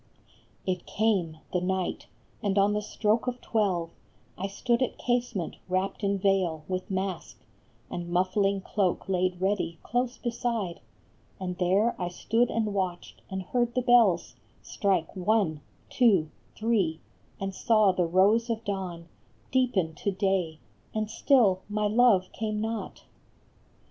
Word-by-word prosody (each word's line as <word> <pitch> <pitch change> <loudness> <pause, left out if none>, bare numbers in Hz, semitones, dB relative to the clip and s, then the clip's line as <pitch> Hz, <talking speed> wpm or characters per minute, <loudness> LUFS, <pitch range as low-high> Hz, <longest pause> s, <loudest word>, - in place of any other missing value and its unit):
It 180 -2 -2
came, 195 -7 +1 0.2
the 180 - +1
night, 185 0 -2 0.3
and 200 -1 0
on 200 +1 +4
the 210 - 0
stroke 215 +2 0
of 250 0 -2
twelve 190 -9 0 0.4
I 195 - -3
stood 235 +5 0
at 255 - 0
casement, 240 -8 -1
wrapped 190 +3 -1
in 200 0 +1
veil, 185 -5 +1
with 185 0 -3
mask 190 -2 -3 0.5
And 175 0 -5
muffling 190 +2 +1
cloak 190 -1 -1
laid 185 -1 0
ready 190 -3 0
close 245 +2 -1
beside; 230 -7 -2 0.6
And 180 -1 -3
there 195 +6 +2
I 175 - 0
stood 225 +7 +1
and 215 -2 -1
watched, 185 -3 -3
and 190 0 -4
heard 240 +4 0
the 250 - +1
bells 230 -8 +4 0.3
Strike 190 -5 0
one, 185 -5 +1 0.3
two, 195 - +3 0.2
three, 205 -8 +1 0.4
and 195 0 -3
saw 215 0 +4
the 180 -2 0
rose 205 +7 +3
of 230 0 -2
dawn 180 -4 -4 0.4
Deepen 235 -11 +1
to - - -1
day, 190 -4 0 0.4
and 215 0 -1
still 220 -9 +4
my 210 0 0
love 210 -3 +4
came 215 -1 -3
not. 225 +1 -4
195 Hz, 140 wpm, -28 LUFS, 185-225 Hz, 0.6 s, on